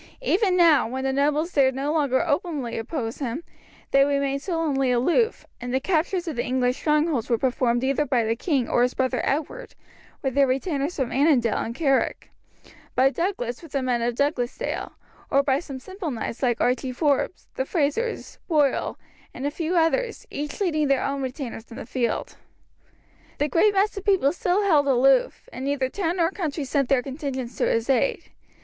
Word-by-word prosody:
Even 380 -4 +2
now, 330 -7 +5
when 260 +3 -4
the 270 0 0
nobles 300 +5 +1
dared 265 -2 +3
no 280 +3 -1
longer 280 -5 +2
openly 285 -6 -1
oppose 225 0 -4
him, 275 +3 -3 0.5
they 275 0 +6
remained 280 -1 0
sullenly 305 -7 0
aloof, 345 - +1 0.2
and 245 0 -4
the 260 - +1
captures 355 +3 0
of 315 - -3
the 240 - 0
English 250 0 0
strongholds 300 -5 +1
were 235 - +3
performed 245 0 +1
either 275 +2 +1
by 255 -5 +1
the 225 +1 0
king 265 -2 0
or 240 - +2
his 250 +1 +1
brother 260 -1 0
Edward, 310 - -3 0.5
with 265 -2 -1
their 280 0 +4
retainers 280 +4 -1
from 260 -4 -2
Annandale 265 -5 +3
and 230 - -4
Carrick; 275 -3 0 0.6
by 265 +1 +4
Douglas 245 - -2
with 330 -4 -13
the 275 -2 0
men 245 -2 0
of 235 0 -1
Douglasdale; 260 -3 -2 0.4
or 275 0 +3
by 275 -1 +2
some 280 -5 -7
simple 375 +5 -6
knights 230 -2 -5
like 240 -3 +1
Archie 255 +1 0
Forbes, 290 +5 0
the - - -1
Frazers, 335 - -2
Boyle, 295 -5 +1 0.4
and 260 - -5
a 290 - 0
few 330 +3 -2
others, 450 +9 +1
each 295 -5 -5
leading 310 -7 +1
their 275 -1 +2
own 275 0 -2
retainers 255 -3 -6
in 230 - -10
the - - -7
field. 245 -3 -2 1.0
The 295 - +1
great 400 +7 +3
mass 395 +2 +4
of 395 - -6
the 405 - +3
people 310 -7 +3
still 360 +3 +1
held 305 -8 +3
aloof, 265 0 +3
and 255 - -6
neither 270 -2 0
town 355 +2 -2
nor 335 0 +2
country 315 -7 -3
sent 275 -1 0
their 260 -2 +3
contingents 265 -3 -5
to - - +1
his 230 0 0
aid. 275 - 0
275 Hz, 185 wpm, -24 LUFS, 255-325 Hz, 1.0 s, they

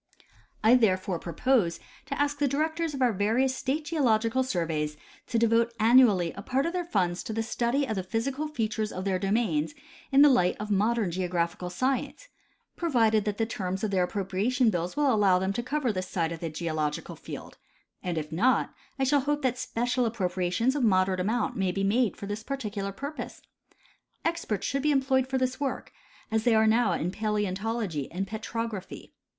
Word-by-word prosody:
I 220 +2 +6
therefore 190 -7 +2
propose 175 - +1 0.3
to 275 - -4
ask 290 0 0
the 290 - +3
directors 315 +3 -1
of 265 - 0
our 240 -3 +3
various 230 +7 +1
state 290 +4 -2
geological 250 -6 +2
surveys 160 -10 -1 0.3
to 235 - 0
devote 230 +1 +2
annually 220 -7 +5
a 200 - -8
part 260 +6 0
of 335 - -2
their 360 -1 -1
funds 180 - 0
to 220 - -5
the 225 +1 -1
study 240 +5 0
of 220 - -3
the 190 - -1
physical 255 +10 -2
features 220 -6 -2
of 185 +1 -5
their 190 -2 0
domains 195 -7 0 0.4
in 275 +1 +7
tlie 290 -2 +7
light 180 -7 +2
of 210 0 -4
modern 210 -1 +1
geographical 180 0 -2
science, 260 - -2 0.5
provided 225 -10 +2
that 210 -1 -2
the 225 - +1
terms 190 -3 -4
of 215 - 0
their 190 -2 +2
appropriation 205 +6 +1
bills 175 +5 -3
will 285 -3 +3
allow 200 -4 +4
them 190 +1 -1
to 240 - -2
cover 255 -2 -1
this 185 -1 -3
side 165 -3 -1
of 165 - -5
the 165 - -3
geological 155 -2 -3
field; - - -9 0.4
and 175 -2 -3
if 155 0 -4
noj:, 225 +11 +2 0.3
I 270 - 0
sliall 275 +1 +2
hope 295 0 0
that 250 -1 0
special 245 +1 0
appropria 185 -5 -2
tions 240 +8 +1
of 285 - 0
moderate 185 -3 +3
amount 215 +5 0
may 190 -2 +1
be 195 +2 -2
made 210 +1 +2
for - - -7
this 205 +2 -4
particular 215 -6 -4
pur 280 +9 -5
pose. 305 - -8 0.8
Experts 330 - -1
should 275 +1 -1
be 300 - +1
employed 265 -2 +2
for 265 0 -1
this 255 0 -1
work, 280 -2 -3 0.4
as 220 0 +1
they 235 -2 +4
are 220 0 +5
now 220 -3 +3
in 170 +2 -1
paleontology 210 - -2
and 190 +3 -2
petrograpl^y. 220 -2 -5
220 Hz, 190 wpm, -28 LUFS, 185-260 Hz, 0.8 s, in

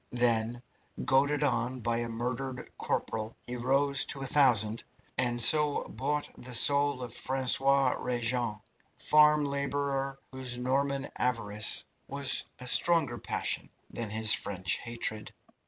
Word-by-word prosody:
Then, 120 0 +1 0.4
goaded 145 +2 +2
on 125 -2 -1
by 115 +1 -1
a 120 0 -3
murdered 125 +3 -5
corporal, 110 0 -3
he 125 - -6
rose 135 +3 +1
to 135 - -2
a - - -3
thousand, 120 -6 +2 0.3
and 120 -1 0
so 150 +4 +5
bought 145 +2 -3
the 125 0 -7
soul 140 +1 +4
of 120 -2 -8
Francois 135 +1 +2
Rejane, 120 -3 -2 0.3
farm 150 0 +4
labourer, 140 -1 -3
whose 130 -2 -3
Norman 135 +2 -1
avarice 110 -4 0 0.2
was 140 -1 0
a 125 - -10
stronger 140 -3 +2
passion - - -3 0.2
than 115 -2 -4
his 110 +1 +3
French 95 -2 -1
hatred. 115 -2 -3
125 Hz, 125 wpm, -29 LUFS, 115-140 Hz, 0.4 s, so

